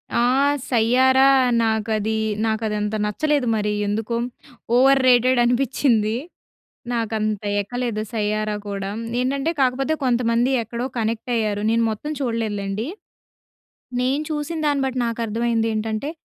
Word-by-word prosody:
ఆ! - - +3 0.5
'సయ్యారా' 260 +3 +4 0.3
నాకది 220 0 0 0.3
నాకదంత 215 -1 -1
నచ్చలేదు. 285 +5 0
మరి 210 -1 0 0.2
ఎందుకొ 220 +3 -2 0.6
ఓవర్ 270 +2 +5
రేటెడ్ 250 0 +4
అనిపించింది. 240 -3 +1 0.8
నాకు 230 -2 -2
అంత 215 -1 -2 0.2
ఎక్కలేదు 235 0 -3
'సయ్యారా' 215 -1 -1
కూడా. 195 -1 -4 0.3
ఏంటంటే, 275 +5 0
కాకపోతే 265 +4 +1
కొంతమంది 240 0 +2
ఎక్కడో 235 +2 -4
కనెక్ట్ 225 +1 -2
అయ్యారు. 210 -2 -1
నేను 230 0 +2
మొత్తం 295 +8 -5
చూడలేదులెండి. 220 -2 -2 1.1
నేను 265 +4 0
చూసిన 305 +2 -3
దాన్ని 285 -2 +1
బట్టి, 255 -1 -2
నాకు 230 0 -3
అర్థమైంది 225 +1 0
ఏంటంటే 220 +5 -2
230 Hz, 115 wpm, -22 LUFS, 215-255 Hz, 1.1 s, ఓవర్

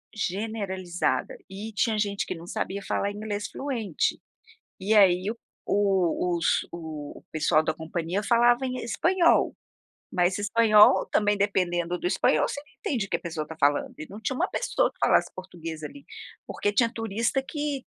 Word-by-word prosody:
Generalizada 195 - -2
e 205 +3 -7
tinha 215 +1 +1
gente 200 -1 -1
que - - -3
não 165 0 -10
sabia 195 +2 -3
falar 200 - -1
inglês 205 0 -4
fluente, 235 - -2 0.6
e 195 +3 0
aí 190 -1 +5
o 230 - -5 0.3
o 185 -3 +1
os 170 - +1
o 155 -3 -7
pessoal 155 0 +3
da 155 0 0
companhia 165 +4 -3
falava 240 +3 +3
em 255 0 -3
espanhol, 340 +9 +2 0.6
mas 180 +1 +2
espanhol 210 0 +5
também 205 -1 +2
dependendo 180 -3 0
do - - -7
espanhol 180 -4 +2
você 285 - -4 0.2
entende 235 -8 -1
o - - -28
que - - +1
a - - -15
pessoa 160 -3 -4
tá 160 - -8
falando, 145 0 +2
e 155 - -7
não 205 - -9
tinha 260 +4 -2
uma - - 0
pessoa - - 0
que - - -35
falasse - - +3
português 165 -4 -8
ali, 280 - -9 0.4
porque 205 - -1
tinha 230 +2 +3
turista 225 +4 -1
que, 290 -1 -4
200 Hz, 165 wpm, -26 LUFS, 175-225 Hz, 0.6 s, aí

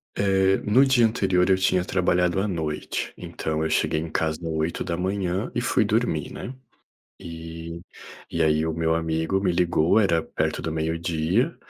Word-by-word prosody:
Eh, 95 -1 +3
no 120 +6 +5
dia 125 -4 +4
anterior 95 -5 +1
eu 95 - +5
tinha 95 -1 +2
trabalhado 90 0 +1
à 100 - 0
noite, 80 -5 -3
então, 80 0 -3
eu 80 - -1
cheguei 80 0 +1
em 80 0 -5
casa 80 -1 0
8h 90 +4 -2
e - - +1
fui - - +2
dormir, - - 0
né. 125 - -7 0.7
E 85 0 -8 0.5
e 85 - -1
aí 80 0 +2
o 80 - -1
meu 80 0 +1
amigo 80 +3 -1
me 95 -2 +1
ligou. 85 +2 +3
Era 85 -6 +2
perto 80 - -2
do 80 - -3
12h 80 - 0
85 Hz, 160 wpm, -24 LUFS, 80-95 Hz, 0.7 s, no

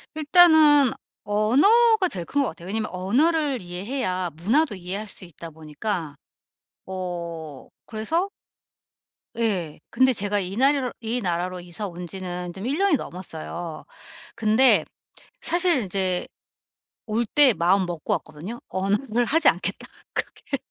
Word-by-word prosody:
일단은 310 -4 +6 0.3
언어가 375 - +4
제일 175 - -5
큰 285 - 0
것 250 - -1
같아요. 175 -1 -11
왜냐하면 215 +2 -2
언어를 275 - +1
이해해야 185 +1 -3
문화도 230 - +1
이해할 190 +4 -5
수 190 - -7
있다 170 -1 -10
보니까 160 +1 -5 0.7
어 170 -5 -6 0.2
그래서 320 - -1 1.1
예. 190 -9 -1
근데 260 +2 +3
제가 205 -1 -1
이 190 +1 -4
나리로 270 -1 +2
이 230 +2 -2
나라로 180 0 -2
이사 175 +4 -6
온 175 0 -8
지는 180 -1 -6
좀 195 +5 -6
1 280 +5 0
년이 390 -6 +3
넘었어요. 170 -4 -7 0.5
근데 225 +4 +4 0.6
사실 345 -4 +2
이제 185 -1 -1 0.8
올 225 +2 -1
때 270 +2 +6
마음 185 +1 +2
먹고 175 -3 -3
왔거든요? 165 +10 -6
'언어를 210 +6 0
하지 320 +7 +2
않겠다.' - - -3 0.3
그렇게. 275 - -4
205 Hz, 265 characters per minute, -24 LUFS, 180-265 Hz, 1.1 s, 일단은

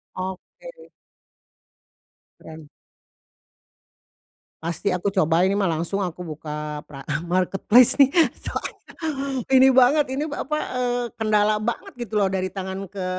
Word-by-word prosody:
Oke. 330 - -8 1.5
Keren. 160 -1 -12 2.0
Pasti 170 +4 -2
aku 180 +1 -1
coba 180 -2 +2
ini 195 - +1
mah 195 -4 +1
langsung 170 +5 -2
aku 180 -2 -5 0.2
buka 150 -1 -6
pra 140 -2 -12 0.2
marketplace 190 +7 +3
nih 275 -2 +5 0.3
soalnya - - -4 0.8
ini 265 +1 +7
banget 260 +2 +4
ini 285 +4 -2
apa, 300 0 -3 0.2
eee, 245 -1 0
kendala 215 -1 +2
banget 235 +1 -4
gitu 230 -4 -2
loh 200 - +3
dari 185 -1 -2
tangan 190 0 -5
ke 195 -2 -5
195 Hz, 120 wpm, -23 LUFS, 180-245 Hz, 2.0 s, ini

